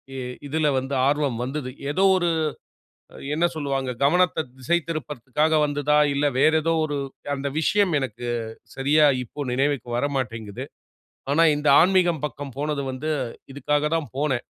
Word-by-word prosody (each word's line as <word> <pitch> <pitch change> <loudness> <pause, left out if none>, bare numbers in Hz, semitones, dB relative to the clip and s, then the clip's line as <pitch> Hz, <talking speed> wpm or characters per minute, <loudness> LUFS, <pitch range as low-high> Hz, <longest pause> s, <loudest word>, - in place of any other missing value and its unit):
இ - - -5 0.3
இதுல 155 +2 0
வந்து 135 +2 -5
ஆர்வம் 145 -4 +1
வந்தது. 135 +1 -4 0.2
ஏதோ 185 +6 +1
ஒரு 175 -2 +1 1.1
என்ன 165 +3 +2
சொல்வாங்க, 135 -3 -2
கவனத்த 175 +2 +3
திசை 150 +7 +1
திருப்புறதுக்காக 150 0 -1
வந்ததா 145 0 +1 0.2
இல்ல, 140 +1 0
வேற 155 - +5
ஏதோ 165 +1 +2
ஒரு 145 -2 -3 0.4
அந்த 140 0 -4
விஷயம் 195 +3 +2
எனக்கு 120 -2 -5 0.5
சரியா 145 +3 +4 0.2
இப்போ 140 +4 -6
நினைவுக்கு 135 -1 0
வரமாட்டேங்குது. 120 -6 -3 0.7
ஆனா 160 +4 +4
இந்த 150 +1 -2
ஆன்மீகம் 175 -4 +3
பக்கம் 145 -3 -9
போனது 150 -1 -1
வந்து 145 +5 -3 0.4
இதுக்காக 145 +2 0
தான் 155 -6 -2
போனேன். 135 -4 0
145 Hz, 135 wpm, -24 LUFS, 135-155 Hz, 1.1 s, வேற